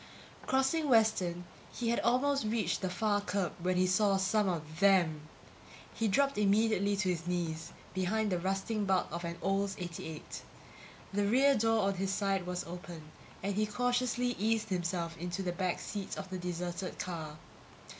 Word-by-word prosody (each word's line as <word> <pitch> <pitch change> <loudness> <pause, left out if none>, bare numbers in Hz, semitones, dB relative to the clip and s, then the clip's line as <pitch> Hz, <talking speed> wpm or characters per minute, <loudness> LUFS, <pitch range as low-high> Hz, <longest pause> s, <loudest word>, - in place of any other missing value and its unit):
Crossing 270 +4 +2
Western, 205 -7 +3 0.3
he 235 -2 -2
had 235 - +2
almost 275 +4 +2
reached 215 -5 0
the 185 - -1
far 205 +3 +1
curb 200 -2 -1
when 180 +1 +1
he 185 - +4
saw 195 +2 +3
some 195 +1 +2
of 160 -2 -4
them. 180 -6 +4 0.7
He 225 - 0
dropped 275 +4 +2
immediately 205 0 +3
to 195 -2 +1
his 170 -1 -2
knees 165 -2 -2 0.2
behind 205 +3 0
the 180 - +1
rusting 195 +4 -1
bulk 190 -1 +1
of 170 +2 -4
an 170 0 -4
Olds 195 0 +1
88. 170 -3 -6 0.7
The 200 0 +1
rear 270 +6 +5
door 225 -3 +2
on 195 0 +2
his 190 +1 -1
side 195 -2 0
was 180 0 -2
open, 170 -3 -9 0.3
and 200 +1 0
he 215 +2 +1
cautiously 245 +2 0
eased 220 +1 +1
himself 175 -2 -1
into 175 +2 -3
the 180 - -1
back 180 0 -1
seat 200 -2 -5
of 195 -1 -6
the 185 - -3
deserted 180 +1 -4
car. 160 -4 -5
195 Hz, 165 wpm, -32 LUFS, 175-215 Hz, 0.7 s, rear